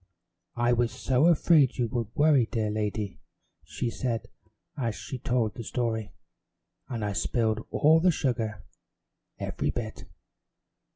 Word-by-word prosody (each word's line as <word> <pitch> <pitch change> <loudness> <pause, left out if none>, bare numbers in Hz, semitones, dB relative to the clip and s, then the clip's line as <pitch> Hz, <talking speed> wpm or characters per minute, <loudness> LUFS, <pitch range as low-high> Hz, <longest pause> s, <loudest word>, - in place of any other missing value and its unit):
"I 120 +1 +2
was 120 -1 +1
so 130 +8 +2
afraid 155 -4 +4
you 120 -2 +1
would 115 -1 -2
worry, 145 -6 +4
dear 110 -3 -1
lady," 105 -3 -2 0.4
she 120 - -3
said 115 -3 -3 0.5
as 115 -7 -2
she 130 - -6
told 115 -3 0
the 115 - -7
story, 110 -2 -2 0.8
"and 115 -4 -3
I 100 - -1
spilled 110 +1 0
all 160 +2 +5
the 180 +3 +4
sugar 120 - -1 0.7
every - - -2
bit." - - -5
120 Hz, 130 wpm, -28 LUFS, 110-130 Hz, 0.8 s, all